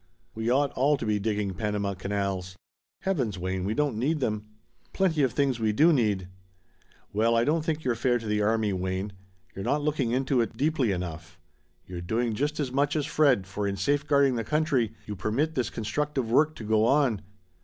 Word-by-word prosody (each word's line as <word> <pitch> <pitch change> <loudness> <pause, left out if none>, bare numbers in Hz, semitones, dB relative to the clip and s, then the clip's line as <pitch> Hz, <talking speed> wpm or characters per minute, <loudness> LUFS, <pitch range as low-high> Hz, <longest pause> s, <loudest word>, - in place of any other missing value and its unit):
We 110 +1 -2
ought 140 +2 +2
all 140 +3 +2
to - - -4
be 105 -1 +1
digging 105 -2 -1
Panama 105 -1 -2
canals!" 95 -1 -3 0.5
"Heavens, 135 - -1
Wayne 95 +1 -2
we 105 +3 -1
don't 145 -7 0
need 150 +6 +1
them." 105 -4 -2 0.5
"Plenty 175 -6 +2
of 130 -4 +2
things 135 -4 +1
we 110 -1 +1
do 160 +9 +5
need." 105 -8 +1 0.9
"Well 115 +3 +2
I 115 - +3
don't 155 +4 +1
think 160 -1 -2
you're 125 - +1
fair 120 +1 +1
to 115 - -8
the 105 0 0
army, 110 -1 +1
Wayne. 95 +2 -3 0.4
You're 95 - -5
not 145 +6 0
looking 145 -5 0
into 130 +1 +1
it 115 0 -3
deeply 140 -6 +1
enough. 85 -3 -5 0.5
You're 90 -1 -7
doing 115 +6 -1
just 145 +7 -1
as 140 -4 -1
much 140 +3 +1
as 150 -2 0
Fred, 140 -9 +3
for 100 +2 -3
in 100 0 -2
safeguarding 140 +4 +2
the 115 - -1
country 135 -5 0
you 105 - -5
permit 115 - -1
this 125 -4 -1
constructive 130 +1 -2
work 155 +5 +3
to - - -8
go 110 0 +2
on. 130 -5 +2
115 Hz, 195 wpm, -27 LUFS, 105-145 Hz, 0.9 s, do